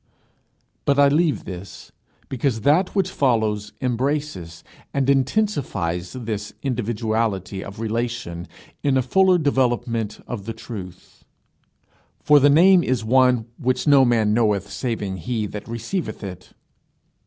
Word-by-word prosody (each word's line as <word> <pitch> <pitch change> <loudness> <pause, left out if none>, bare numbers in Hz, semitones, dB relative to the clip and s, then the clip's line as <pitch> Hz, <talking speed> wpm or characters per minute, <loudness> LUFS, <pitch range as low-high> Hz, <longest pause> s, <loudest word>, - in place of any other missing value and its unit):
But 140 - +2
I 140 0 +6
leave 150 - +1
this, 95 0 -9 0.4
because 125 -3 -1
that 160 - +2
which 190 -2 +1
follows 110 - 0
embraces 125 - -2 0.3
and 135 -1 +1
intensifies 130 - -1
this 110 -4 -5
individuality 110 -6 -2
of 100 +2 -10
relation 115 -6 -3 0.3
in 140 -2 +2
a 130 - +2
fuller 185 +7 +4
development 120 -7 0
of 110 -6 -6
the 115 - -3
truth. 105 -6 -10 1.0
For 150 -1 +5
the 145 +1 +5
name 175 +4 +6
is 125 -3 -1
one 125 -1 +3
"which 130 +1 0
no 140 -3 +6
man 115 -4 +2
knoweth 105 -3 +1
saving 105 -7 -3
he 110 +5 -2
that 105 0 -7
receiveth 115 - -4
it." 95 -2 -9
120 Hz, 125 wpm, -22 LUFS, 105-140 Hz, 1.0 s, I